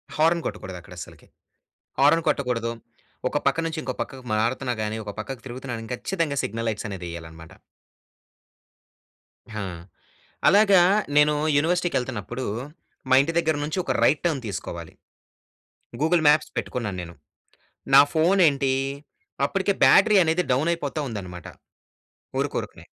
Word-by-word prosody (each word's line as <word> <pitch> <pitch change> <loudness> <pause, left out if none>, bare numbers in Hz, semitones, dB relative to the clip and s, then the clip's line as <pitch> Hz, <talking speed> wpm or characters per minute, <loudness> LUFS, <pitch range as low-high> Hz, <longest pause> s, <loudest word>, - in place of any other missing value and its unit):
Horn 165 +2 +3
కొట్టకూడదక్కడ 90 -2 -7
అస్సలకి. - - -11 0.7
Horn 150 +4 +4
కొట్టకూడదు, 120 -4 -1 0.6
ఒక 145 - -1
పక్క 140 - +2
నుంచి 160 -1 -4
ఇంకో 130 0 -4
పక్కకి 130 -1 -6
మారుతున్నా 120 +3 0
గాని, 110 +1 -3
ఒక 105 - -6
పక్కకి 120 +2 -7
తిరుగుతున్నా 125 0 -6
కానీ 115 +2 -9
ఖచ్చితంగా 160 0 -2
సిగ్నల్ 115 +2 -3
లైట్స్ 105 +1 -5
అనేదేయాలనమాట. 85 -3 -8 2.0
హా! 105 - -3 0.8
అలాగా 200 -2 +6 0.4
నేను 150 0 +5 0.2
యూనివర్సిటీకెళ్తున్నప్పుడు 130 - -1 0.6
మా 130 - +6
ఇంటి 165 +4 -2
దగ్గర 160 -2 +1
నుంచి 155 +5 -3
ఒక 135 - -2
రైట్ 145 +5 +3
టర్న్ 155 -6 0
తీసుకోవాలి. 85 -4 -6 1.1
గూగుల్ 160 +1 +2
మ్యాప్స్ 150 +1 +3
పెట్టుకున్నాను 105 -7 -3
నేను. 85 0 -10 0.8
నా 135 - +11
ఫోనేంటి 160 -5 +3 0.7
అప్పటికే 195 +3 0
బ్యాటరీ 210 0 +6
అనేది 165 +3 +1
డౌన్ 145 +6 +1
అయిపోతా 150 -2 -4
ఉందన్నమాట. 90 -6 -7 0.9
ఉరుకురకనే... - - -4
135 Hz, 120 wpm, -24 LUFS, 110-160 Hz, 2.0 s, నా